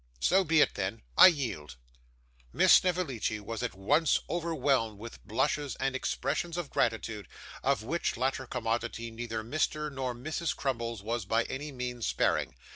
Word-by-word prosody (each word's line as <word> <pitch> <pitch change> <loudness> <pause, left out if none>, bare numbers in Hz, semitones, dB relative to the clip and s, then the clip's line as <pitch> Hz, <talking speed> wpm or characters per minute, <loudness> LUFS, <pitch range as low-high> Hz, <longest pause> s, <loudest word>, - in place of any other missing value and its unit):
So 190 - +4
be 160 -2 +4
it - - +3
then. - - -3
I - - +11
yield.' 115 - -1 0.8
Miss - - +5
Snevellicci 160 - +2
was 110 +1 -5
at 85 - -3
once 145 - +3
overwhelmed 145 -10 0
with 115 +3 -10
blushes 140 +5 0
and 135 0 -1
expressions 155 +6 -2
of 175 -5 -4
gratitude, 110 -2 -1 0.3
of 110 - +1
which 170 +9 -1
latter 130 0 -1
commodity 115 -1 -2
neither 115 -1 -4
Mr. 150 +4 -1
nor 130 -2 -3
Mrs. 155 +6 -3
Crummles 115 -5 -3
was 115 -1 -2
by 115 +3 +2
any 145 +5 -5
means 125 -2 -4
sparing. - - 0
125 Hz, 150 wpm, -30 LUFS, 115-150 Hz, 0.8 s, I